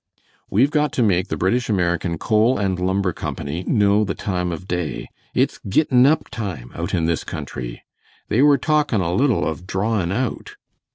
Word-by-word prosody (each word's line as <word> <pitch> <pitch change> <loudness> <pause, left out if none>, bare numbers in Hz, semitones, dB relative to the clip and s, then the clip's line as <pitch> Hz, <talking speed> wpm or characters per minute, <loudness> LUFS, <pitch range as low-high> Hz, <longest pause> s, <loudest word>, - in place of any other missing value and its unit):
"We've 130 +9 +3
got 150 -2 +1
to 125 - +2
make 95 -3 +2
the - - -3
British 115 +8 0
American 85 -3 0
Coal 110 +8 +2
and 95 -2 -1
Lumber 95 0 0
Company 80 +4 -4
know 105 -1 +3
the 100 - -2
time 90 -3 -2
of 90 +3 -7
day. 90 -4 -3 0.3
It's - - +1
gittin' 130 +3 +4
up 155 +2 +2
time 90 - -5
out - - -3
in 85 -2 +1
this 85 -1 0
country. - - -6 0.4
They 120 - +2
were 145 -1 +6
talkin' 150 -5 +1
a 85 -1 -1
little 125 +3 +2
of 85 +3 -5
drawin' 95 -2 0
out." 120 +2 -3
100 Hz, 175 wpm, -21 LUFS, 90-120 Hz, 0.4 s, were